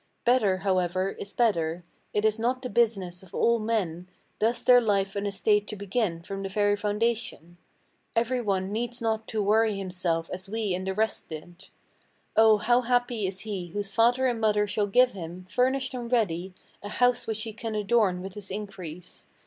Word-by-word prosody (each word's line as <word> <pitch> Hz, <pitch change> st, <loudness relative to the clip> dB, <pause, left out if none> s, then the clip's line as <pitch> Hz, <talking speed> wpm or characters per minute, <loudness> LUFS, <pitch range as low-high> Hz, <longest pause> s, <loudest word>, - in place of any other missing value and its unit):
Better, 225 Hz, -6 st, +3 dB
however, 185 Hz, 0 st, 0 dB
is 200 Hz, -, -5 dB
better. 175 Hz, -7 st, +1 dB, 0.3 s
It 210 Hz, +1 st, 0 dB
is 220 Hz, 0 st, +2 dB
not 255 Hz, +3 st, 0 dB
the 250 Hz, -, -4 dB
business 200 Hz, -6 st, +1 dB
of 190 Hz, 0 st, -14 dB
all 235 Hz, 0 st, +3 dB
men 190 Hz, -6 st, -2 dB, 0.3 s
Thus 230 Hz, +2 st, +1 dB
their 245 Hz, -1 st, +7 dB
life 200 Hz, -3 st, +1 dB
and 200 Hz, 0 st, -1 dB
estate 205 Hz, +1 st, +1 dB
to 215 Hz, -, -5 dB
begin 200 Hz, -4 st, -2 dB
from 195 Hz, +2 st, -5 dB
the 195 Hz, -, -4 dB
very 205 Hz, +1 st, +2 dB
foundation: 210 Hz, -4 st, -2 dB, 0.6 s
Every 240 Hz, +2 st, +1 dB
one 195 Hz, -3 st, -1 dB
needs 240 Hz, +3 st, -3 dB
not 220 Hz, -1 st, -1 dB
to 215 Hz, -2 st, -1 dB
worry 215 Hz, 0 st, +3 dB
himself 180 Hz, -3 st, -2 dB
as 185 Hz, +1 st, -7 dB
we 215 Hz, -2 st, -1 dB
and 185 Hz, +1 st, -3 dB
the 190 Hz, -, -1 dB
rest 220 Hz, +1 st, -1 dB
did. 175 Hz, +4 st, -9 dB, 0.7 s
Oh, 220 Hz, -1 st, +6 dB
how 240 Hz, +4 st, +3 dB
happy 245 Hz, -3 st, 0 dB
is 190 Hz, 0 st, -4 dB
he 200 Hz, -5 st, -4 dB
whose 195 Hz, +2 st, -5 dB
father 240 Hz, +4 st, +3 dB
and 240 Hz, -3 st, 0 dB
mother 210 Hz, -1 st, +3 dB
shall 205 Hz, 0 st, 0 dB
give 250 Hz, +5 st, +4 dB
him, 180 Hz, -2 st, -8 dB
Furnished 260 Hz, +4 st, +1 dB
and 240 Hz, -1 st, -5 dB
ready, 185 Hz, -6 st, 0 dB, 0.3 s
a 205 Hz, -, -7 dB
house 245 Hz, +3 st, +2 dB
which 220 Hz, -1 st, -2 dB
he 225 Hz, -2 st, -6 dB
can 225 Hz, -1 st, -5 dB
adorn 205 Hz, -3 st, +2 dB
with 190 Hz, 0 st, -7 dB
his 200 Hz, -1 st, -8 dB
increase. 185 Hz, -4 st, -8 dB
210 Hz, 185 wpm, -27 LUFS, 190-230 Hz, 0.7 s, their